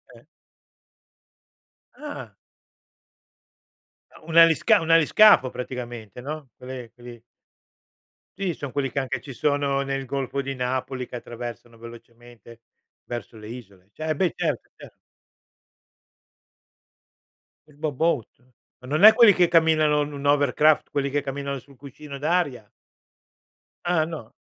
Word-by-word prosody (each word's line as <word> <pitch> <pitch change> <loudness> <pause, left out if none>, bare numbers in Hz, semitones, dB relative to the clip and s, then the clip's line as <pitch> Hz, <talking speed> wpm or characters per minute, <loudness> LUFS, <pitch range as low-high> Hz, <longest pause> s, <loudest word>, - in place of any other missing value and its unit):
Eh. - - -17 1.8
Ah. 135 - -8 1.9
Un 165 0 -1
alisca 165 -1 +6
un 165 0 -1
aliscafo 165 -2 +6
praticamente, 120 -3 -7
no, 145 -1 -7
quelle 125 -2 -9
quelli 120 -1 -12 1.2
Sì, 190 -4 -2
son 140 -4 -7
quelli 140 -2 -1
che 140 - -1
anche 130 -1 -3
ci 135 +2 -10
sono 140 0 0
nel 135 -1 -3
Golfo 140 +1 -3
di 135 0 -5
Napoli 130 0 -3
che 125 - -8
attraversano 120 -1 -9
velocemente 115 0 -14 0.4
verso 120 -1 -7
le 105 0 -11
isole. 100 -6 -12
Ce 155 +3 -3
beh, 180 +1 +1
certo, - - -2
chiaro. - - -14 2.7
Il 150 - -21
boboat? 150 -5 -2 0.4
Ma 125 - -13
non 155 +7 0
è 220 +1 +11
quelli 225 -3 +7
che 175 -1 +3
camminano 155 -3 +3
un 145 0 -4
un 140 0 -7
hovercraft, 145 +1 +3
quelli 140 -1 -1
che 145 0 0
camminano 140 0 -4
sul 140 +2 -19
cuscino 140 +1 -10
d'aria? 145 -8 -1 1.2
Ah 170 -3 +2
no? 155 -9 -9
135 Hz, 120 wpm, -24 LUFS, 120-155 Hz, 2.7 s, è